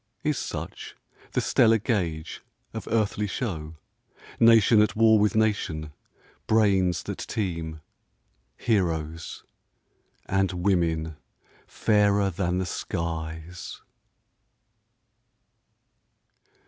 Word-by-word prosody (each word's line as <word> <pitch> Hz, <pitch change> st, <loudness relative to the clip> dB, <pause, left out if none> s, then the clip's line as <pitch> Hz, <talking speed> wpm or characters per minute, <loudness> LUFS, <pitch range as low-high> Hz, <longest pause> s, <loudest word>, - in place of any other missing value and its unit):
Is 150 Hz, -3 st, 0 dB
such -, -, -6 dB, 0.4 s
the -, -, +1 dB
stellar 115 Hz, 0 st, +4 dB
gauge 85 Hz, -, -2 dB, 0.3 s
of -, -, -6 dB
earthly 105 Hz, -2 st, 0 dB
show, 80 Hz, -8 st, -4 dB, 0.6 s
Nation 115 Hz, -1 st, +6 dB
at 105 Hz, -, +1 dB
war 110 Hz, -1 st, +5 dB
with 105 Hz, +2 st, +2 dB
nation, 90 Hz, -9 st, 0 dB, 0.5 s
brains 95 Hz, -6 st, +3 dB
that -, -, -6 dB
teem, 85 Hz, -6 st, -4 dB, 0.8 s
Heroes, 85 Hz, -7 st, -1 dB, 0.8 s
and 95 Hz, 0 st, +1 dB
women 85 Hz, -4 st, 0 dB, 0.5 s
fairer 100 Hz, -2 st, +2 dB
than 90 Hz, 0 st, -1 dB
the 95 Hz, -, -1 dB
skies? 80 Hz, 0 st, -5 dB
95 Hz, 85 wpm, -26 LUFS, 80-105 Hz, 0.8 s, Nation